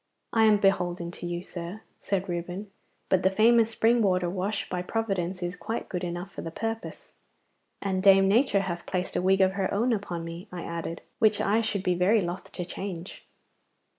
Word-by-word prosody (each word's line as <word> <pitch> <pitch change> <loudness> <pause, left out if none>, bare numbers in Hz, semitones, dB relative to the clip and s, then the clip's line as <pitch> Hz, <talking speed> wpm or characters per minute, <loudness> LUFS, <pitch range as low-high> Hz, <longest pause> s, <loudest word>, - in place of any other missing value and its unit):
'I 225 -1 +5
am 215 -1 +6
beholden 180 -3 +1
to 175 - -7
you, 175 0 -3
sir,' 180 +3 -7 0.2
said 195 -1 -1
Reuben, 180 +3 -4 0.4
'but 190 - +3
the 190 - +4
famous 225 +3 +4
spring 230 +1 +3
water 180 -4 +2
wash 195 +3 -2
by 180 -1 -2
Providence 185 -3 -2
is 175 +1 -3
quite 225 +5 -4
good 180 -1 -3
enough 175 +2 -4
for - - -7
the 165 - -5
purpose.' 225 +6 -5 0.7
'And 190 -2 0
Dame 195 0 +7
Nature 210 0 +3
hath 175 -3 -4
placed 185 -1 -2
a - - +1
wig 190 +1 +3
of 190 0 +5
her 195 -1 -1
own 230 +5 +2
upon 175 -5 -3
me,' 170 +4 -7
I 180 -1 -6
added, 170 0 -5 0.2
'which 215 -3 +4
I 215 +3 +2
should 210 -4 -2
be 180 - +2
very 185 +6 +3
loth 175 0 -4
to 180 - -4
change. 180 -1 -7
190 Hz, 195 wpm, -27 LUFS, 175-210 Hz, 0.7 s, Dame